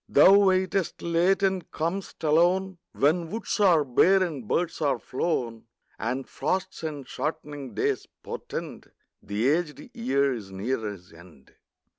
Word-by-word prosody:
Thou 165 +7 +7
waitest 190 -2 +2
late 175 +4 +2
and 190 -2 0
com'st 170 +4 -4
alone, 175 +4 +2
When 165 +3 +2
woods 220 +1 -3
are 175 -7 +5
bare 185 +9 +4
and 145 - -4
birds 170 +4 -1
are 145 -2 +2
flown, 120 -6 -3 0.3
And 130 +4 -2
frosts 185 +7 -2
and 150 -4 -5
shortening 145 -3 -5
days - - -1 0.2
portend - - -6 0.3
The 105 +4 -1
aged 170 - -1
year 140 - +1
is 105 -5 -7
near 110 +8 -2
his 90 -4 -11
end. 80 -5 -17
155 Hz, 135 wpm, -26 LUFS, 130-185 Hz, 0.3 s, Thou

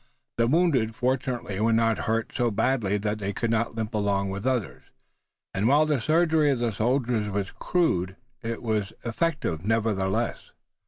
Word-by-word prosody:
The 115 0 +3
wounded 135 -7 +2
fortunately 125 -5 -1
were 110 +2 +2
not 115 0 +2
hurt 115 0 0
so 120 -1 +1
badly 105 -2 +1
that 105 +1 -2
they 100 -1 -2
could 115 +3 -1
not 115 0 0
limp 110 0 -3
along 100 -2 0
with 100 +3 -5
the - - +4
others, 120 -9 -2 0.7
and, 100 +3 +1
while 145 +4 +5
the 150 -5 0
surgery 160 +1 +3
of 135 - +2
the 120 -1 0
soldiers 115 0 0
was 100 -1 -2 0.2
rude, 95 - +2 0.3
it 115 0 -4
was 110 -3 -1
effective 120 - -1
nevertheless. 110 0 -1
115 Hz, 165 wpm, -26 LUFS, 105-130 Hz, 0.7 s, while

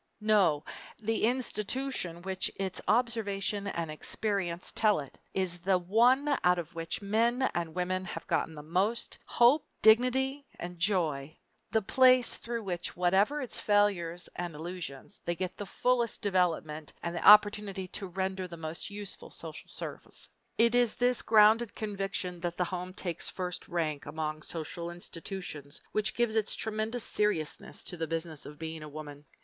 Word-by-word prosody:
No, 200 -9 +3 0.3
to 220 - -19
the 225 0 +2
institution 235 -6 -2
which 190 0 -1
its 190 -1 -3
observation 210 -3 +1
and 170 -5 -3
experience 180 +1 -2
tell 215 -4 +3
it, 140 -2 -9 0.2
is 180 -2 0
the 185 +2 +3
one 245 +10 +3
out 180 0 +5
of 170 0 -5
which 165 +4 -3
men 230 +5 +2
and 165 -2 -3
women 185 +1 -1
have - - -6
gotten 160 - -1
the 150 - -8
most 190 +9 0
hope, 250 +5 +5 0.2
dignity, 255 +5 +4
and 175 0 -7
joy, 160 -6 +1 0.3
the 220 -1 +1
place 255 +2 +5
through 235 -1 -4
which, 175 -3 -3
whatever 195 +11 +3
its 255 - -3
failures 190 -5 +1
and 175 -2 -4
illusions, 170 0 -7
they 175 - -1
get 185 +1 -3
the 205 - -6
fullest 245 +2 0
development 165 -6 0
and 170 0 -3
the 170 - -3
opportunity 205 -2 +6
to 195 - -5
render 190 0 -2
the 170 -1 -9
most 160 0 -5
useful 205 -1 -6
social - - -7
service. - - -7 0.3
It 230 +1 +5
is 245 -2 +4
this 245 0 +2
grounded 220 +1 +5
conviction 195 -4 -3
that 175 0 -3
the 180 - +2
home 180 +1 -5
takes 170 -3 -2
first 180 -1 -5
rank 155 -5 -2
among 155 0 -3
social 170 +2 -4
institutions 170 -4 -6
which 215 -1 0
gives 240 -2 +1
its 215 -1 +1
tremendous 220 +2 -1
seriousness 195 -8 -1
to 180 - -5
the 160 -1 -2
Business 165 -1 -3
of 150 +1 -10
Being 160 0 -5
a 150 - -8
Woman. 145 -1 -9
190 Hz, 160 wpm, -30 LUFS, 170-220 Hz, 0.3 s, opportunity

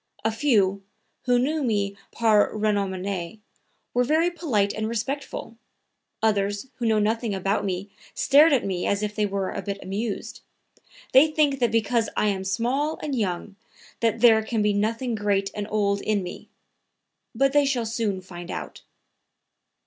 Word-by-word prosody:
A 225 - +3
few, 210 -6 +2 0.4
who 245 -1 +3
knew 300 +6 0
me 205 -4 0 0.2
par 220 -3 +3
renommee, 200 -2 -2 0.5
were 245 - +3
very 315 +6 +2
polite 240 - 0
and 220 0 -2
respectful; 235 0 -4 0.7
others 205 +2 0
who 235 - -1
know 220 -1 +3
nothing 215 0 0
about 195 +2 0
me 195 +1 -3 0.2
stared 295 +4 +5
at 270 -4 +2
me 185 -2 -2
as 200 +1 0
if 210 0 -2
they 210 -1 0
were 195 -1 -2
a - - -4
bit 200 -1 -4
amused. 200 +3 -4 0.7
They 270 +4 +8
think 300 -3 +1
that 240 -2 +3
because 230 0 +1
I 210 - +3
am 190 -1 -2
small 250 +10 0
and 290 -3 -2
young 195 -2 -3 0.4
that 230 -1 0
there 225 -2 +7
can 220 -1 -1
be 210 0 +2
nothing 225 +4 -1
great 200 -2 0
and 205 -1 -4
old 200 -1 +1
in 210 -3 0
me. 180 - -8 0.9
But 275 0 +2
they 290 -1 +4
shall 250 -4 0
soon 220 -4 -2
find 175 -1 -10
out." - - -6
215 Hz, 160 wpm, -25 LUFS, 200-245 Hz, 0.9 s, They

